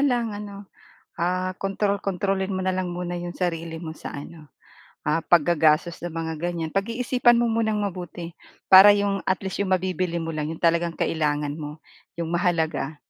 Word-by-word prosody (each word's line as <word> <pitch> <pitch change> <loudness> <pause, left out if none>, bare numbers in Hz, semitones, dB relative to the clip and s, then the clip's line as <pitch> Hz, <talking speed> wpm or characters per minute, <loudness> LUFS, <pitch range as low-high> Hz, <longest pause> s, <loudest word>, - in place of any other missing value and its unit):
lang 240 -5 +1
ano, 205 -1 -7 0.6
ah, 185 +2 0
kontrol-kontrolin 195 -1 -1
mo 185 - -2
na 185 - +1
lang 185 -1 -1
muna 175 0 -4
'yong 175 0 -6
sarili 165 -2 -3
mo 160 - -5
sa - - -8
ano, 150 +2 -9 0.6
ah, 150 +2 +1
paggagastos 165 0 +3
sa 175 - -6
mga 160 -1 -4
ganyan. 170 -1 -3
Pag-iisipan 240 +5 +2
mo 235 -1 +2
munang 220 -2 0
mabuti, 175 -3 -5 0.4
para 195 +2 +10
'yong, 200 -1 0
at 190 - +2
least, 190 -1 -4
'yong 190 -2 +2
mabibili 180 -2 -1
mo 165 - -3
lang 155 -1 -3
'yong 165 - -14
talagang 170 0 +2
kailangan 150 -3 -1
mo, 150 0 -8 0.4
'yong 165 -1 -3
mahalaga. 165 -4 0
175 Hz, 165 wpm, -24 LUFS, 165-195 Hz, 0.6 s, para